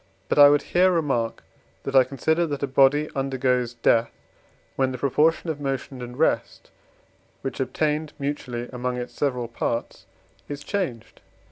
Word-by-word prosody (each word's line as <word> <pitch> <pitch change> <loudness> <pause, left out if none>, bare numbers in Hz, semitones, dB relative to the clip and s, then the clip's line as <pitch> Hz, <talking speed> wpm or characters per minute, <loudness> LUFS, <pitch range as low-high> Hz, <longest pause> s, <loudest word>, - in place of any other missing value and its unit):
But - - +2
I 145 0 +10
would 145 0 +3
here 185 +1 +3
remark 135 -9 -1 0.4
that 135 - -4
I 130 - +8
consider 160 +6 0
that 145 -2 -4
a - - +1
body 140 +3 +4
undergoes 130 -3 0
death, 115 0 +3 0.7
when 130 -1 +1
the 130 - -5
proportion 155 +6 +2
of 145 -2 -7
motion 135 -1 -4
and 125 0 -8
rest 160 - 0 0.7
which 135 -3 -4
obtained 150 +4 -1
mutually 125 -4 -4
among 125 0 -2
its 125 0 -6
several 125 -4 -1
parts 115 0 -4 0.4
is 145 0 -6
changed. 135 - -4
135 Hz, 150 wpm, -24 LUFS, 125-145 Hz, 0.7 s, I